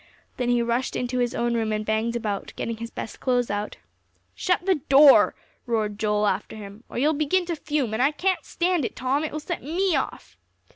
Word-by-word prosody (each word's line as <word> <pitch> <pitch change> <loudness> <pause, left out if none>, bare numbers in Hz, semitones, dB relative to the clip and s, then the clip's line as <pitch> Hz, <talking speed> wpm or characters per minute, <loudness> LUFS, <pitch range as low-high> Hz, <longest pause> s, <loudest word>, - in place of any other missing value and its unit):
Then 245 -1 -1
he 240 -1 +3
rushed 235 +2 -1
into 250 0 -2
his 245 -1 0
own 240 0 0
room 225 -2 0
and 215 0 -2
banged 220 +2 0
about, 210 -4 -3
getting 230 -1 -4
his 230 +1 -6
best 220 - -7
clothes 245 -4 +1
out. 205 +1 -3 0.6
"Shut 360 -1 0
the 375 -7 +2
door," 275 0 +7 0.3
roared 215 -3 -1
Joel 210 -1 +1
after 200 +2 -1
him, 205 +1 -10
"or - - -7
you'll 295 +5 +3
begin 310 +5 +1
to 340 -1 -2
fume, 290 -7 -2
and 220 - 0
I 270 - +5
can't 370 +5 -1
stand 350 -2 0
it, - - -3
Tom; 270 +4 0
it 310 - -3
will 305 - -4
set 340 +3 -5
me 345 +4 0
off." 270 - -4
245 Hz, 210 wpm, -25 LUFS, 220-300 Hz, 0.6 s, door